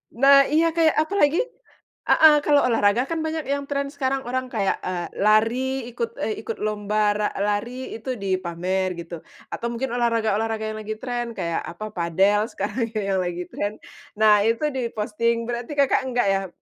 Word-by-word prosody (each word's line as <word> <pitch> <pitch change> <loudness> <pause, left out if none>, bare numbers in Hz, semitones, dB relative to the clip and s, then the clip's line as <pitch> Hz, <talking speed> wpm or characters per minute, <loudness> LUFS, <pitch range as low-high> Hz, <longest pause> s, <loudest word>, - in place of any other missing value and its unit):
Nah, 275 +2 +6
iya 330 +1 +3
kayak 325 -2 +3
apalagi 320 -3 +2 0.7
heeh, 315 -1 +7
kalau 290 -1 +5
olahraga 225 0 +3
kan 330 - -2
banyak 315 0 -2
yang 280 - -2
trend 280 -1 -1
sekarang 270 -1 -1
orang 255 +1 -1
kayak, 200 -3 0
eee, 175 -2 -3 0.2
lari 215 +3 +4 0.3
ikut, 235 -1 -3
eee, 215 - -1
ikut 225 0 -5
lomba 210 0 -1 0.2
ra 210 - +1 0.2
lari 210 +3 -1 0.2
itu 225 +4 -8
dipamer 185 0 -1
gitu, 170 0 -7 0.4
atau 235 - -3
mungkin 235 +2 -3
olahraga-olahraga 225 -2 0
yang 215 - -6
lagi 215 +1 -5
trend 240 -2 -3
kayak 170 -1 -1
apa, 175 +5 -7
padel 190 +5 +2
sekarang 215 +4 -2 0.2
yang 190 - +1
lagi 175 0 -3
trend, 205 +1 -3 0.4
nah 215 -1 +6
itu 230 +5 0
di-posting, 230 -1 -1
berarti 240 +2 -4
Kakak 275 - +3
enggak 245 -4 +1
ya? 195 0 -1
225 Hz, 160 wpm, -23 LUFS, 205-260 Hz, 0.7 s, heeh